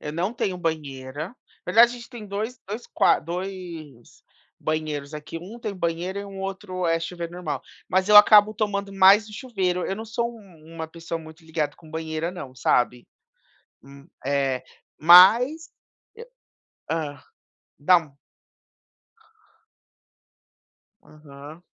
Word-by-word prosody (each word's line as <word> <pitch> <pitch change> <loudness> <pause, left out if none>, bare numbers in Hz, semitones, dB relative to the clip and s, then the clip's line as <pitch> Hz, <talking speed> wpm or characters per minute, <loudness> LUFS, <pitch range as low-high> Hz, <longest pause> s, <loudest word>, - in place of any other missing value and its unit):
Eu 150 - -6
não 175 +7 -2
tenho 195 -6 -2
banheira, 150 - -4 0.3
aliás, 235 +2 +6
a - - -7
gente 235 -1 -11
tem 235 -4 -10
2, 215 +5 -5
2 215 +5 -6
qua - - +3
2 170 -7 -8 0.4
banheiros 155 -2 -3
aqui, 150 +2 -7
1 200 +8 -10
tem 215 -4 -5
banheira 175 +3 -2
e - - -7
um 195 -1 -9
outro 190 -2 -4
é 165 0 +2
chuveiro 170 0 -6
normal, 155 -6 -4 0.3
mas 190 +1 +1
eu 210 - +7
acabo 210 0 +8
tomando 200 -2 -2
mais 195 +2 +6
no 215 - -13
chuveiro. 190 -8 -2
Eu 195 - -3
não 220 - -6
sou 235 +1 -2
uma 165 -7 -10
pessoa 165 0 -6
muito 160 0 -14
ligada 155 -2 -3
com 160 -2 -17
banheira, 160 +1 -3
não, 140 -8 -9
sabe, 125 -1 0 0.8
hum, 140 +2 -15 0.2
eh, 135 -2 0 0.4
mas, 230 - +7 1.2
e - - 0
hã, 145 -4 -4 0.6
dá 160 -1 +3 2.9
Aham. 150 +1 -13
175 Hz, 130 wpm, -24 LUFS, 155-200 Hz, 2.9 s, acabo